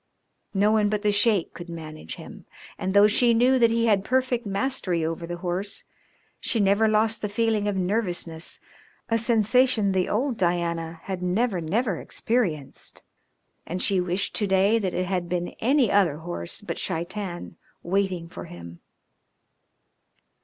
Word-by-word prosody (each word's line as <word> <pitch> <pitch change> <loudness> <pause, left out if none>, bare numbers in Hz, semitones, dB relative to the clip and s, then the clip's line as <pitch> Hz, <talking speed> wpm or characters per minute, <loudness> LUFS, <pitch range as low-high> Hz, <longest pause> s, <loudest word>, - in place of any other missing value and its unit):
No 205 +2 +4
one 215 -1 +3
but 210 0 -1
the 210 - +3
Sheik 205 -3 +2
could 175 0 -9
manage 155 - -8
him, - - -12 0.3
and 190 +1 -2
though 200 +1 +8
she 230 +3 +4
knew 255 +3 +4
that 230 -1 +5
he 230 0 +1
had 205 -4 +3
perfect 255 -1 0
mastery 195 -6 0
over 165 +1 -4
the 175 0 -5
horse, 185 +3 -3 0.6
she 230 - 0
never 200 +2 +3
lost 215 +1 +2
the 210 - -2
feeling 215 0 0
of 205 - 0
nervousness, 180 -4 -2 0.5
a 230 0 +2
sensation 225 -1 +3
the 185 -1 0
old 245 +3 0
Diana 170 -2 -1
had 190 -2 -4
never, 185 +1 0
never 195 +4 0
experienced, 180 - -2 0.6
and 180 +3 -3
she 190 0 +2
wished 180 +2 -1
to 205 - 0
day 195 +4 +3
that 190 -4 -2
it 185 - 0
had 180 -2 -2
been 175 0 -1
any 255 0 +3
other 185 -7 +3
horse 160 - -5
but - - -5
Shaitan 175 0 -4 0.3
waiting 185 -2 -1
for 175 - -9
him. 85 0 -11
195 Hz, 155 wpm, -25 LUFS, 175-220 Hz, 0.6 s, though